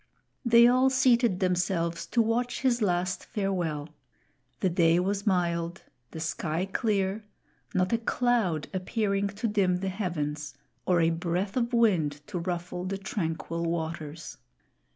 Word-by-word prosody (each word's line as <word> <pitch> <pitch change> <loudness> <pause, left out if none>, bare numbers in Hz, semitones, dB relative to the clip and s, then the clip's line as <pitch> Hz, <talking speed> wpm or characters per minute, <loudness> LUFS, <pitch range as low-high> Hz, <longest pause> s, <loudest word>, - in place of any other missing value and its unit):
They 235 -1 +7
all 255 +2 +4
seated 245 -7 +3
themselves 175 -2 0
to 235 - +2
watch 240 +2 -1
his 245 -2 +2
last 180 -2 0
farewell. 175 -7 -2 0.7
The 190 - +3
day 170 -1 +4
was 200 +3 -1
mild, 170 -2 0 0.3
the 160 - -8
sky 160 +2 -2
clear, 200 0 -1 0.5
not 185 +3 +2
a 230 - +2
cloud 225 -9 +1
appearing 200 +1 0
to 205 +3 -3
dim 200 -4 +2
the 190 +1 -2
heavens, 150 -6 -3 0.3
or 180 -2 +4
a 165 0 +3
breath 175 +4 -2
of 240 -1 0
wind 175 - +2
to 175 - -4
ruffle 175 0 -4
the 195 +1 -2
tranquil 170 -3 -3
waters. 160 - -4
185 Hz, 135 wpm, -28 LUFS, 170-215 Hz, 0.7 s, They